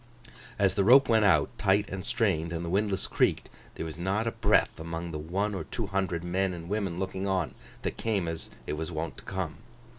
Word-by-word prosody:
As 100 -3 +3
the 100 - +2
rope 130 +6 +7
went 110 -2 +4
out, 80 -7 +3
tight 100 +1 +3
and 95 -1 -5
strained, 100 -9 0
and 85 0 -3
the 85 - -3
windlass 100 0 +1
creaked, - - +1 0.3
there - - -4
was 80 0 -7
not 95 +5 0
a 115 - 0
breath - - +2
among 85 +1 -4
the 75 - -4
one 95 +7 -1
or 95 - -4
two 115 - -3
hundred 95 -4 -1
men 90 +1 0
and 85 -1 -8
women 100 -4 -1
looking 95 +1 -2
on, 95 -4 0 0.3
that - - -2
came 105 -6 0
as 80 -1 -5 0.2
it - - -3
was 80 +3 -3
wont 80 -4 -4
to - - -15
come. 95 -5 -4
95 Hz, 215 wpm, -29 LUFS, 85-100 Hz, 0.3 s, rope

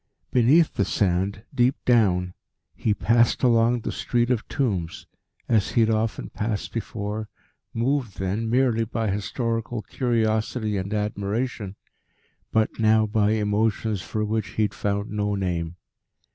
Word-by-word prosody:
Beneath 135 +7 +4
the 100 - +1
sand, 100 +1 0
deep 125 +2 +3
down, 90 -7 +3 0.4
he 110 - -1
passed 115 +4 +2
along 120 0 +4
the - - -3
Street 120 0 0
of 115 -3 -1
Tombs, 95 - -2 0.4
as 110 -4 +1
he 120 - +4
had 110 0 +3
often 110 0 -1
passed 105 -1 -3
before, 110 -1 -4 0.4
moved 120 -3 -1
then 100 +4 -2
merely 120 -2 +2
by 110 -2 -2
historical 115 +2 -2
curiosity 110 -2 0
and 95 +1 -3
admiration, 105 0 -2 0.8
but 110 +1 +1
now 110 0 +4
by 105 0 +2
emotions 105 -1 0
for 105 +4 -2
which 110 -1 -1
he 110 - +4
found 100 +1 -3
no 105 -1 -1
name. 85 -3 -2
110 Hz, 130 wpm, -24 LUFS, 100-115 Hz, 0.8 s, Beneath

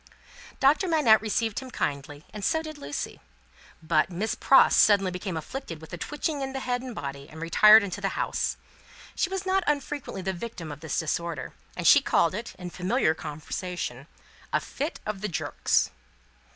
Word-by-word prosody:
Doctor 295 +8 +4
Manette 295 -10 +5
received 225 0 -1
him 260 -1 -9
kindly, 145 - -4
and 210 -1 -7
so 320 +9 +1
did 310 -2 -8
Lucie. 145 - -5 0.6
But, 160 +1 +2
Miss 195 +5 -2
Pross 270 - +5
suddenly 195 -3 +5
became 180 -1 -4
afflicted 165 - -6
with 160 +2 -13
a - - -4
twitching 295 - -3
in 270 0 -3
the 270 - -3
head 245 -1 -1
and 250 -3 -7
body, 140 0 -6
and 160 - -11
retired 210 +6 +7
into 190 -3 -5
the - - -2
house. - - -1 0.6
She 360 - 0
was 385 0 -3
not 380 0 +2
unfrequently 285 -8 -2
the 190 +1 -1
victim 175 -5 -7
of 145 - -8
this 160 0 -3
disorder, 165 -2 -2 0.2
and - - -4
she - - +8
called 170 - +2
it, 220 +5 -6
in 180 -1 -7
familiar 185 0 +1
conversation, 155 -3 -5 0.4
"a - - +2
fit 295 +4 -5
of 210 -2 -4
the 210 - -1
jerks." 175 - 0
200 Hz, 180 wpm, -27 LUFS, 160-265 Hz, 0.6 s, she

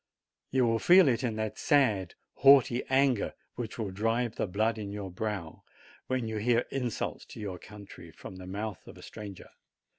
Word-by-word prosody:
You 130 -2 +2
will 115 -1 +1
feel 180 +3 +7
it 125 -1 +1
in 115 -3 -1
that 110 -1 -4
sad, 110 - +2 0.2
haughty 135 -3 +6
anger 130 -4 +2 0.2
which 115 -3 -6
will 110 -4 -3
drive 115 +4 -1
the - - -1
blood 110 +4 0
to 110 - -5
your 100 -1 -6
brow 95 -4 -4 0.5
when 130 -3 -1
you 110 -1 -3
hear 120 +2 +2
insults 125 -4 -3
to - - -11
your 95 -4 -5
country 100 -1 -12
from 95 - -11
the 90 0 -9
mouth 105 +2 -5
of - - -11
a - - -13
stranger. 100 -3 -10
110 Hz, 180 wpm, -29 LUFS, 100-125 Hz, 0.5 s, feel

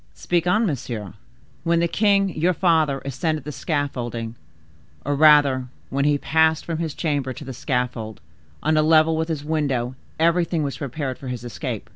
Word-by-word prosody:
"Speak 175 - 0
on, 215 +6 +3
monsieur." 120 - -4 0.5
"When 170 0 +2
the 170 - +2
king 200 +1 +2
your 175 +1 0
father 160 -6 +2
ascended 150 +4 -2
the 150 - -6
scaffold, 140 -5 -2 0.9
or 145 +1 0
rather 145 -4 +5 0.2
when 140 +1 +1
he 145 -1 +3
passed 160 +2 +2
from 165 -2 -3
his 160 -4 -3
chamber 140 -5 -1
to 145 +3 -9
the 135 - -6
scaffold, 125 -4 -3 0.4
on 155 +1 +2
a - - +5
level 160 +1 +4
with 160 0 -1
his 155 -3 -3
window, 140 -6 -1 0.3
everything 170 -1 +2
was 140 -2 -4
prepared 140 -1 -4
for 135 - -8
his 125 -2 -5
escape. 120 -3 -5
150 Hz, 170 wpm, -23 LUFS, 130-160 Hz, 0.9 s, rather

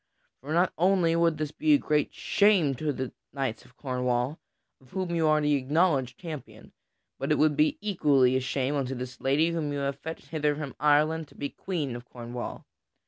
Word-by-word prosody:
For 140 +4 -8
not 175 +3 +2
only 180 -2 +3
would 170 -2 +2
this 155 -1 -3
be 305 - +2
a - - +7
great 150 - 0
shame 200 -9 +3
to 150 +4 -2
the 130 -2 -4 0.2
knights 135 -4 -3
of 125 0 -22
Cornwall 125 +1 -1 0.4
(of 130 - -21
whom 185 -2 -2
you 165 -2 +2
are 155 0 +4
the 150 0 +2
acknowledged 140 -2 +1
champion), 160 -5 -9 0.5
but - - -2
it - - +4
would 155 -1 +3
be 150 +1 +2
equally 145 -11 +3
a - - +3
shame 130 +1 -1
unto 135 -2 -1
this 125 0 -7
lady 150 +5 +2
whom 160 -3 -2
you 145 - -2
have 140 0 -2
fetched 160 +3 -8
hither 150 -2 0
from 145 -3 -5
Ireland 150 +2 +3
to - - -20
be 140 - -4
Queen 155 -10 -4
of 120 0 -8
Cornwall. 120 0 -7
150 Hz, 195 wpm, -28 LUFS, 130-165 Hz, 0.5 s, a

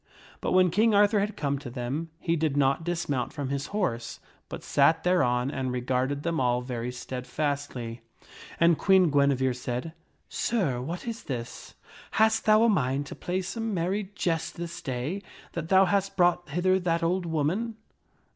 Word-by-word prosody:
But - - -1
when 185 -1 +5
King 215 +4 +3
Arthur 205 +1 +5
had 210 +2 -2
come 140 -2 -1
to 135 - -8
them, 130 +7 -4
he 165 - 0
did 155 -3 0
not 140 +2 +2
dismount 160 -7 -2
from 145 -4 -4
his 140 0 -2
horse, 120 - -2 0.3
but - - -7
sat 160 +3 +3
thereon 135 -8 +2
and 130 -3 -2
regarded 130 +3 -1
them 170 -1 -1
all 125 -1 +1
very 125 -1 -4
steadfastly; 125 -1 -4 0.6
and 170 -1 +4
Queen 190 -4 +4
Guinevere. 140 -2 +3
said, 125 +5 -4 0.2
" - - -43
Sir, 165 - -1
what 165 - -5
is 230 -1 -5
this? 120 -4 -6 0.4
Hast 220 0 +3
thou 215 0 +6
a - - +5
mind 140 - +1
to - - -8
play 185 +1 -2
some 225 +3 -3
merry 190 +3 -1
jest 165 -2 -1
this 170 0 -6
day 135 +8 -3 0.3
that 165 -1 -5
thou 190 0 +6
hast 195 +1 0
brought 175 -2 +3
hither 185 +5 +2
that 170 -2 0
old 175 +1 0
woman?" 170 +9 -1
160 Hz, 170 wpm, -27 LUFS, 130-185 Hz, 0.6 s, thou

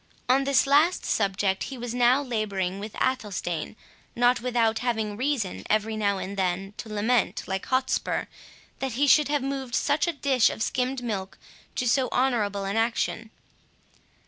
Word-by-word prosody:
On 265 +2 +3
this 275 -2 +3
last 295 +6 +3
subject, 195 -1 0
he 270 - -7
was 240 -1 -5
now 245 +3 +4
labouring 200 -6 -2
with 210 +1 -7
Athelstane, 205 -10 -2 0.4
not 245 0 +3
without 230 -3 +1
having 220 -4 -1
reason, 250 -5 -2
every 215 +1 +1
now 200 -2 +1
and 195 +1 -5
then, 190 +1 -1
to 225 - -7
lament, 215 +2 +1
like 190 0 -4
Hotspur, 260 0 0 0.5
that 265 -3 -2
he 275 +5 +2
should 295 +2 +5
have 290 -2 0
moved 270 -2 -3
such 295 +3 +1
a 345 - 0
dish 275 -5 +3
of 220 - -3
skimmed 255 +1 -1
milk 195 -5 -4 0.4
to 250 - -1
so 255 +2 +2
honourable 210 -6 0
an 200 +3 -2
action. 225 0 -1
235 Hz, 160 wpm, -26 LUFS, 205-260 Hz, 0.5 s, should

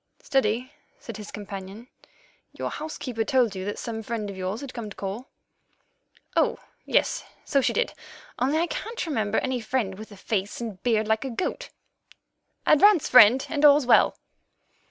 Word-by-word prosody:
"Steady," 255 +1 0 0.3
said 230 -3 -8
his 210 -1 -9
companion; 200 +2 -8 0.7
"your - - -4
housekeeper 255 -7 -4
told 250 -6 +2
you 185 - -4
that 205 - -4
some 225 -1 -5
friend 215 -2 -4
of - - -9
yours 190 +5 -4
had 275 -2 -8
come 230 -3 -6
to 200 - -11
call." 200 +6 -5 1.1
"Oh, - - +2 0.3
yes, - - +1 0.2
so 275 - +2
she - - +1
did, 480 - 0 0.5
only 270 +5 +1
I 335 - +2
can't 455 +6 -4
remember 220 -9 -1
any 260 -2 -1
friend 215 -5 -2
with 215 0 -10
a 205 - -12
face 200 0 -3
and 220 -6 -6
beard 220 -3 +1
like 220 +2 +1
a 270 - -3
goat. 370 - -3 1.0
Advance, 365 +2 +5
friend, 250 +2 +7
and 300 -2 -2
all's 290 -1 +7
well." 245 - +5
230 Hz, 165 wpm, -25 LUFS, 210-270 Hz, 1.1 s, friend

